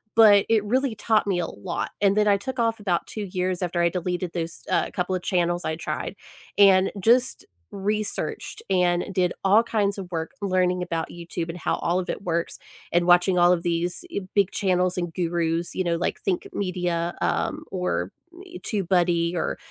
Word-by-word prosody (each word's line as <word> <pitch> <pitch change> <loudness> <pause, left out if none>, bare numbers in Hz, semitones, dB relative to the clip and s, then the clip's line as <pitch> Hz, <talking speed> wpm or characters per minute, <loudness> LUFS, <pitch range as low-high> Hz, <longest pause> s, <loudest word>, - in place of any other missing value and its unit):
but 210 -3 +7
it 220 -2 +3
really 250 +3 0
taught 215 0 +1
me 190 -3 +1
a 170 - 0
lot 100 - -4
and 200 -1 +3
then 210 0 +3
I 200 -1 +5
took 260 +6 -6
off 230 -1 +1
about 185 -5 0
2 215 - -6
years 185 -1 -2
after 175 -1 0
I 170 - +4
deleted 180 0 -3
those, 165 -1 -4
uh, - - +2
couple 180 +1 -2
of 185 - -1
channels 175 -1 0
I 160 0 -1
tried, 155 +3 -4 0.4
and 195 -2 +6
just 245 +5 +2 0.3
researched 210 - -3
and 180 -2 +2
did 180 -1 +1
all 200 +3 +6
kinds 210 -3 0
of 190 -3 -7
work 165 -2 -3
learning 185 -2 +1
about 165 -2 -3
YouTube 170 0 -6
and 165 - -5
how - - -1
all 175 +2 0
of 185 - -5
it - - -3
works, 170 -3 -2 0.4
and 175 0 +3
watching 180 +1 +4
all 175 0 +6
of 175 -1 +1
these 175 - -2
y 335 - -2 0.2
big 200 -2 +3
channels 185 -2 +1
and 175 -2 -3
gurus, 170 -1 -1
you 185 - 0
know, 170 -1 0
like 175 - -1
Think 185 -3 -1
Media, 175 -3 -1
um, - - -1
or, 90 0 -2 0.3
eh, 360 -1 -10
TubeBuddy 175 -4 +1
or 170 - -1
180 Hz, 190 wpm, -24 LUFS, 170-200 Hz, 0.4 s, but